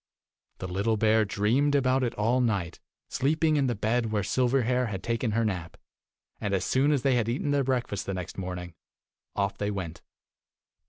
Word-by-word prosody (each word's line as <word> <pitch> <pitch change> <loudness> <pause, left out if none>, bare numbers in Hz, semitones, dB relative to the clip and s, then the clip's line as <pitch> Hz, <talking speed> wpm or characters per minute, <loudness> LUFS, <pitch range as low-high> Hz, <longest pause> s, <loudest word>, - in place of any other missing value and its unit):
The 95 - -5
little 100 +5 0
bear 110 0 +3
dreamed 120 +9 +1
about 130 -1 +2
it 120 - -1
all 115 +5 +2
night, 100 -8 -1 0.3
sleeping 155 +3 +1
in 140 -2 +2
the 120 - 0
bed 110 +2 0
where 105 -2 0
Silverhair 125 +2 +1
had 95 -3 -5
taken 115 -1 -1
her 115 +1 +1
nap, 90 -5 -3 0.6
and 100 -1 -1
as 95 - -1
soon 135 +3 +2
as 140 -4 +1
they 135 -2 +3
had 120 -2 +1
eaten 140 +4 -1
their 140 -1 +2
breakfast 125 -7 -2
the 95 - -2
next 90 -2 -6
morning, 90 -2 -5 0.6
off 100 0 -1
they 105 - -1
went. 90 -5 -5
115 Hz, 180 wpm, -28 LUFS, 100-130 Hz, 0.6 s, bear